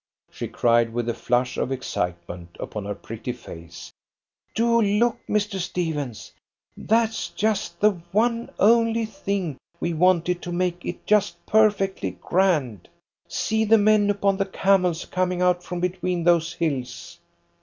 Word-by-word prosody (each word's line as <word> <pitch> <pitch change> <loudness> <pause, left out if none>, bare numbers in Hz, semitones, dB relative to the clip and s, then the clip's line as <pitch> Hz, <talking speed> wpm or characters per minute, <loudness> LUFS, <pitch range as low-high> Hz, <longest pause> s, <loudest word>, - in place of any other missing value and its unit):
she - - -5
cried, 115 -1 +2
with 120 0 -2
a 120 - 0
flush 125 +2 0
of 130 - -1
excitement 85 -8 -4
upon 105 -2 -5
her 100 0 -3
pretty 115 +4 -6
face. 85 -9 -11 0.6
"Do 235 +1 +3
look, 215 +3 +2
Mr. 210 -2 0
Stephens! 160 - -3 0.4
That's 220 -5 0
just 215 +1 -1
the 210 +1 +5 0.2
one 230 +3 +1
only 230 +1 +4
thing 195 -7 -3 0.2
we 170 - -1
wanted 180 +1 +2
to 175 - -6
make 175 0 -1
it 175 - -6
just 210 -1 +1
perfectly 205 -3 +2
grand. 155 - 0 0.4
See 220 0 0
the 220 +1 +5
men 210 -1 +4
upon 200 -1 +1
the 195 0 0
camels 185 -3 +1
coming 180 -1 -1
out 180 -1 +2
from 180 0 -5
between 180 -1 -1
those 170 -1 +3
hills!" 135 -8 -4
180 Hz, 140 wpm, -24 LUFS, 135-205 Hz, 0.6 s, the